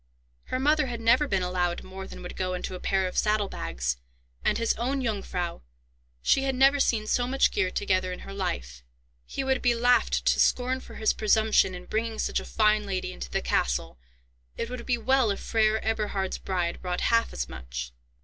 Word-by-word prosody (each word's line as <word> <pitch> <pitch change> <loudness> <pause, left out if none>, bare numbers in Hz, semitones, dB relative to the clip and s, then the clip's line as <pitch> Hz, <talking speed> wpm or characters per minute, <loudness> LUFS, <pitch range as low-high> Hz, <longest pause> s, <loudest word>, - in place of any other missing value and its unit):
Her - - -2
mother 300 +1 +3
had 235 -2 -4
never 235 +6 +4
been 190 -6 0
allowed 180 -1 -1
more 190 0 -8
than - - -10
would 180 - -7
go 185 -1 -2
into 180 - -4
a 180 - -6
pair 190 0 +1
of 180 - -1
saddle 210 -1 +2
bags; 65 - -3 0.5
and - - +2
his 230 -1 +1
own 260 +4 -1
Jungfrau—she - - -3
had 270 -1 0
never 270 +2 +5
seen 225 -5 +2
so 245 +3 +1
much 270 +1 +3
gear 190 -3 +1
together 185 0 0
in 180 - -6
her 195 - -8
life; 65 - -4 0.5
he 270 - -3
would 265 -1 +1
be 245 -1 +3
laughed 245 +1 +3
to - - +3
scorn 255 +1 +2
for - - -12
his 220 - +2
presumption 215 -3 +3
in 180 0 -9
bringing 220 +2 -2
such - - 0
a - - -8
fine 215 -1 +2
lady 190 -2 -2
into - - -7
the - - -2
castle; - - 0 0.6
it 230 - -3
would 250 -2 -6
be 245 -1 +2
well 260 0 +3
if 200 - -1
Freiherr 220 -1 +2
Eberhard's 210 -4 -1
bride 175 -2 -2
brought 180 -1 -2
half 230 0 +2
as 60 -1 -3
much. 60 -1 -6
205 Hz, 195 wpm, -27 LUFS, 180-235 Hz, 0.6 s, never